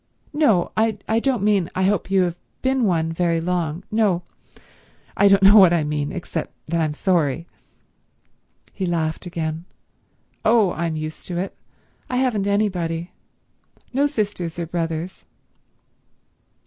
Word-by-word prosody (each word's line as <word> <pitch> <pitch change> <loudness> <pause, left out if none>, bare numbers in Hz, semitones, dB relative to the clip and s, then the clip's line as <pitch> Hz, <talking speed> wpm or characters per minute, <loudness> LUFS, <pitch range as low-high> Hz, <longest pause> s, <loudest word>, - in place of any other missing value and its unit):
No—I 220 - +1
don't 250 -4 0
mean 200 -4 +2
I 185 - +1
hope 195 0 +1
you 195 -1 +3
have 175 -2 -1 0.3
been 260 -2 +2
one 165 -4 +1
very 170 -1 +1
long. 170 0 -2
No—I 200 -1 -2
don't 195 0 +5
know 200 +3 +8
what 185 -4 +8
I 165 -3 +2
mean, 150 -1 -2
except 175 -3 -5
that 170 0 +1
I'm 155 -2 -1
sorry." 170 -3 0 1.3
He 190 -3 -3
laughed 165 0 -2
again. 165 -1 -4 0.8
"Oh 220 -4 +4
I'm 165 -1 -2
used 155 0 -6
to 175 - -4
it. 190 +3 -3 0.5
I 250 - -2
haven't 235 -6 +1
anybody. 180 -5 -1 0.8
No 280 +3 +3
sisters 205 - -3
or 170 - -2
brothers." 165 +1 -4
180 Hz, 130 wpm, -22 LUFS, 165-205 Hz, 1.3 s, know